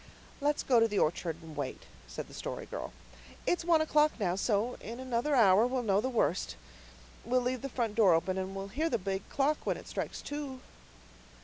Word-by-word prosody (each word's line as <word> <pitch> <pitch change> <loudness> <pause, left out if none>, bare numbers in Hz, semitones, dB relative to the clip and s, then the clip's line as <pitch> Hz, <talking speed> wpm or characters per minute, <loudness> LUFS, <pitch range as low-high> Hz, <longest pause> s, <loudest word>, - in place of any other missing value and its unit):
"Let's 295 0 +1
go 250 - +4
into 230 0 +5
the 210 -2 -3
orchard 165 0 +1
and 160 -1 -10
wait," 140 -3 -4 0.2
said - - -6
the - - -14
Story - - -5
Girl. - - -6 0.5
"It's 350 - +1
one 330 -2 +4
o'clock 305 -1 +3
now, 180 -4 +1
so 210 +4 +1
in 230 +3 -7
another 260 +3 0
hour 215 -1 +6
we'll 255 0 -1
know 200 -2 +3
the 260 - -1
worst. 215 -7 0 0.7
We'll 250 +2 +2
leave 250 0 -1
the 275 - -4
front 235 -4 -1
door 205 -6 +5
open, 185 +3 0
and 190 +1 -4
we'll 195 0 -5
hear 310 +10 0
the 235 - +1
big 195 -1 -4
clock 290 +2 +1
when - - 0
it - - -11
strikes - - -4
two." 290 -3 -5
235 Hz, 205 wpm, -31 LUFS, 195-270 Hz, 0.7 s, hour